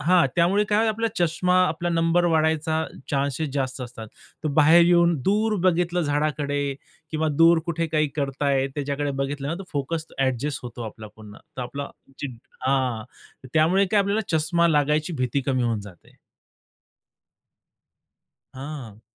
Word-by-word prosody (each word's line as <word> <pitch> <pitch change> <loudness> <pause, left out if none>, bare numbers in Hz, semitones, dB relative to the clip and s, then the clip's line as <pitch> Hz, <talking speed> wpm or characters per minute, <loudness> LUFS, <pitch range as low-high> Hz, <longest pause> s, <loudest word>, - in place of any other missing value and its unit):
हां. 170 +1 +4
त्यामुळे 185 +5 +3
काय 215 +2 +3
आपला 225 +1 0
चष्मा 175 +1 +1
आपला 170 +2 -2
नंबर 165 +1 +2
वाढायचा 160 0 +1 0.3
चान्सेस 140 +2 -1
जास्त 130 -2 -2
असतात. 115 -3 -8 0.4
तर - - +1
बाहेर 165 +3 +7
येऊन 170 0 +4
दूर 215 +2 +2
बघितलं 175 -1 +2
झाडाकडे 145 -1 -1 0.4
किंवा 155 0 0
दूर 165 +1 +6
कुठे 165 0 -1
काही 155 -1 +1
करतायत, 140 -1 0
त्याच्याकडे 145 0 -2
बघितलं 140 +1 -3
ना, 160 - -1
तो 195 - -7
फोकस 155 +3 -2
अ‍ॅडजस्ट 135 +2 -1
होतो 120 -1 -7
आपला 110 0 -9
पुन्हा. 105 -1 -13 0.2
तर 130 - -3
आपला 140 +3 -5 0.3
जे 145 - -3 0.4
हां. 130 -5 0 0.5
त्यामुळे 175 +6 +4
काय 205 +2 +3
आपल्याला 200 -3 0
चष्मा 170 +2 +2
लागायची 150 +2 +1
भीती 130 +2 0
कमी 130 -2 +1
होऊन 115 -3 0
जाते. 100 -4 -15 2.4
हां. 130 -6 -8
150 Hz, 140 wpm, -24 LUFS, 135-170 Hz, 2.4 s, बाहेर